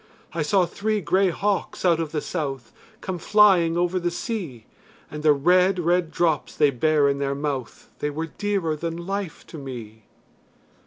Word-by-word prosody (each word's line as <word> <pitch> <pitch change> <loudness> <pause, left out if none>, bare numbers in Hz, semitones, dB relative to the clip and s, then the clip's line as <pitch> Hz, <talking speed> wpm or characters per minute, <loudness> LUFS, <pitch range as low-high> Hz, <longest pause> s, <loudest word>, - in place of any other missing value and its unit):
I 165 - -2
saw 180 +5 +3
three 215 +4 -1
grey 185 +2 +2
hawks 200 +2 -2
out 170 -2 +4
of 160 -2 -3
the 155 -2 -2
south 135 -7 -4 0.3
Come 185 -2 -4
flying 185 -4 +4
over 175 +1 +1
the 175 0 0
sea, 170 - -5 0.5
And 150 - -6
the 155 0 +5
red 180 +6 +3
red 175 0 +1
drops 160 -4 0
they 145 - +4
bare 145 +3 +2
in 140 0 0
their 140 0 -1
mouth 140 -4 -4
They 150 - -1
were 155 +3 -3
dearer 190 -2 -2
than 165 +2 -5
life 195 -3 -4
to 160 - -10
me. 115 -6 -9
165 Hz, 170 wpm, -24 LUFS, 145-185 Hz, 0.5 s, the